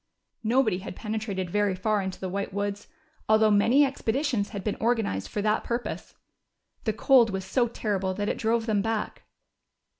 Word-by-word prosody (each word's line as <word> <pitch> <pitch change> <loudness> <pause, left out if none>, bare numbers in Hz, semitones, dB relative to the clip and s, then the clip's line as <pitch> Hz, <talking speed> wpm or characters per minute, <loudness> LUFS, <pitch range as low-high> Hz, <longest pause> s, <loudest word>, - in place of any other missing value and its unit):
Nobody 225 -4 +2
had 195 - -8
penetrated 210 -5 -3
very 205 -1 +1
far 210 +2 0
into 190 -1 -5
the 190 - -3
White 200 +2 -3
Woods, 205 +1 -3 0.4
although 220 0 +5
many 235 +8 +5
expeditions 265 -4 -1
had 200 -3 -6
been 210 - 0
organized 220 - 0
for 205 - -3
that 215 0 +1
purpose. 240 +1 -4 0.7
The 220 - +1
cold 245 +1 +5
was 190 -1 -4
so 240 +5 +1
terrible 195 -5 -2
that 205 +1 -2
it - - -2
drove 225 +1 +1
them 215 -3 +1
back. 225 0 -3
215 Hz, 170 wpm, -27 LUFS, 200-230 Hz, 0.7 s, although